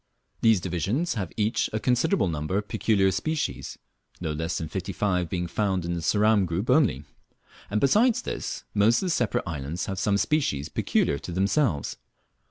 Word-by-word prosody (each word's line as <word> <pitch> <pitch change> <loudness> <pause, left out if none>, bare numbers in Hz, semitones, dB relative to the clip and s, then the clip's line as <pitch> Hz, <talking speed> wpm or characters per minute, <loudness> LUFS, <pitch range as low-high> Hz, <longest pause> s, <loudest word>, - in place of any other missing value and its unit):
These 110 -3 +5
divisions 95 - -1
have 100 -7 -4
each 110 +1 +1
a 110 - -1
considerable 130 - +2
number 80 +3 -2
of 105 0 -2
peculiar 100 -4 +2
species, 155 - -3 0.4
no 80 -3 -3
less 80 +2 -2
than 80 - -3
fifty 95 +4 -4
five 90 -3 0
being 90 -1 -2
found 95 0 -1
in 85 - -2
the 85 - -2
Ceram 105 +2 +3
group 95 +9 -1
only; 130 - +3 0.7
and 105 - 0
besides 215 - +3
this, - - -4
most 110 - +3
of - - -1
the - - 0
separate 120 -8 0
islands 80 0 -4
have 95 -1 -4
some 100 +1 +2
species 95 - 0
peculiar 70 -1 0
to 90 - -7
themselves. 95 - 0
95 Hz, 175 wpm, -26 LUFS, 85-115 Hz, 0.7 s, These